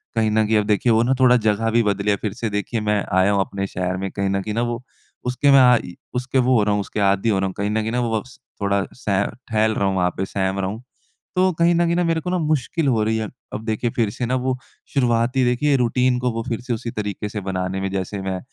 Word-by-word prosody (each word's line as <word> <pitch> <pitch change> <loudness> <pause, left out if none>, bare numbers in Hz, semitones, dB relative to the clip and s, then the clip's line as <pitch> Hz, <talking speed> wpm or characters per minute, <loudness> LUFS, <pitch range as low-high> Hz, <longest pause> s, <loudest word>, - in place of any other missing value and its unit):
कहीं 110 -1 +2
न 110 0 +3
कहीं 110 0 +3
अब 105 - +1
देखिए 105 +3 +2
वो 110 0 +4
ना 125 +2 +2
थोड़ा 125 -1 +6
जगह 110 0 +1
भी 115 +1 +4
बदली 100 0 0
है - - +3
फ़िर 105 -1 -3
से 115 +1 -3
देखिए 105 +2 -2
मैं 105 -1 +1
आया 95 +2 +4
हूँ 100 - +2
अपने 100 0 -3
शहर 90 0 -2
में 95 +1 -3
कहीं 100 -1 -1
न 95 0 0
कहीं 105 +2 -4
न - - 0
वो 120 +1 -3 0.4
उसके 125 +3 +2
में 140 - +8
आ 125 -1 +7
इ 90 - -9 0.2
उसके 125 +2 -1
वो 130 +1 +3
हो 105 - +3
रहा 105 0 +1
हूँ 100 - +1
उसके 100 - -5
आदि 100 +2 +2
हो 100 -3 +2
रहा 95 - 0
हूँ। 95 - -5
कहीं 100 +1 -1
न 110 +1 0
कहीं 110 - -2
न - - -2
वो 120 -2 0
वक्स 130 +4 -9 0.2
थोड़ा 100 0 +1
सह 100 -5 0 0.2
ठहल 110 -1 +2
रहा 100 - +1
हूँ 95 - 0
वहाँ 90 -1 +2
पे 95 - -1
सहम 95 0 -2
रहा 95 -1 -1
हूँ, 110 +5 -7 0.5
तो 185 +1 +3
कहीं 170 +1 +4
न 170 +1 +3
कहीं 175 0 +1
मेरे 165 -1 +1
को 180 +2 -1
मुश्किल 155 -1 0
हो 115 -5 +2
रही 110 +1 0
है। 110 -1 -2 0.3
अब 110 - -5
देखिए 110 +2 -1
फ़िर 115 -3 0
से 120 +4 -4
ना 125 +2 0
वो 130 0 -1 0.4
शुरुआती 125 0 +2
देखिए 125 +4 +2
रूटीन 125 0 +2
को 125 -1 0
वो 115 0 -3
फ़िर 120 -1 -2
से 120 0 -3
उसी 115 +1 -4
तरीके 105 -1 -4
से 105 - -4
बनाने 95 0 -2
में 95 - -1
जैसे 95 +1 -3
मैं 95 -1 -3
110 Hz, 280 wpm, -21 LUFS, 100-125 Hz, 0.5 s, में